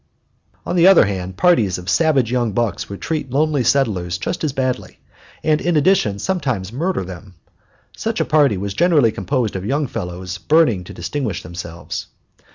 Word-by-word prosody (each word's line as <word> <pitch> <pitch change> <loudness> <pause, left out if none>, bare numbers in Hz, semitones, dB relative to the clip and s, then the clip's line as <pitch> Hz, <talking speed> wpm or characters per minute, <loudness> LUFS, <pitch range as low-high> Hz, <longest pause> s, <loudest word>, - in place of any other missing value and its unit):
On - - -2
the 175 0 +6
other 195 - +7
hand, 95 -2 -4
parties 110 - +3
of 90 0 -10
savage 135 - +2
young 120 -4 0
bucks 115 0 -1
would 100 - -8
treat 155 -4 -3
lonely 145 0 +1
settlers 105 -9 +1
just - - -4
as 155 - 0
badly, 130 -1 -3 0.5
and 155 -1 +2
in 170 -2 +1
addition 150 - +2
sometimes 125 - -2
murder 170 - -1
them. 90 +1 -10 0.6
Such - - -3
a - - +1
party 145 -9 +3
was 100 +1 -4
generally 155 - +3
composed 110 +2 -2
of 95 - -3
young 145 +8 0
fellows 90 -6 -5
burning 150 - +3
to - - -10
distinguish 110 +5 -3
themselves. 85 0 -7
120 Hz, 165 wpm, -19 LUFS, 95-150 Hz, 0.6 s, other